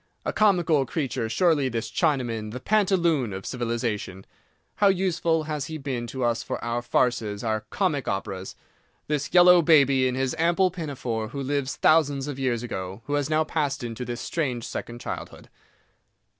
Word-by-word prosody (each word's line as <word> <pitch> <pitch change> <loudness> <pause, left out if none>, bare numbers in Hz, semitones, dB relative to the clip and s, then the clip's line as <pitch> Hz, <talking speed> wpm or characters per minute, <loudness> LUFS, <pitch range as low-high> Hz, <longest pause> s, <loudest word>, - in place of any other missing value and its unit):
A - - -1
comical 175 -8 +3
creature, 130 -6 -2
surely, 145 +1 +2
this 115 -2 -4
Chinaman, 120 -9 0
the 125 - -5
pantaloon 170 - +2
of 95 0 -6
civilization. 115 -6 -3 0.5
How 205 - +4
useful 175 -4 +1
he - - -11
has 150 -2 -2
been 135 -6 -4
to 130 +2 -4
us 120 -1 +1
for - - -4
our 120 +1 -1
farces, 120 -3 0
our 110 -2 -1
comic 155 - -1
operas! 95 -1 -4 0.5
This 145 -1 -2
yellow 180 0 +7
baby, 140 -5 +5
in 125 - -1
his 130 +2 -1
ample 175 +3 +3
pinafore, 130 - -4
who 140 +4 -5
lived 140 0 -1
thousands 145 -4 +2
of 140 -2 -5
years 125 -3 0
ago, 95 -2 -6
who 145 - -4
has 145 0 0
now 155 0 +3
passed 145 -4 -2
into 115 +1 -5
this 120 -1 -5
strange 130 -8 -2
second 120 0 -6
childhood. - - -7
135 Hz, 165 wpm, -25 LUFS, 120-160 Hz, 0.5 s, yellow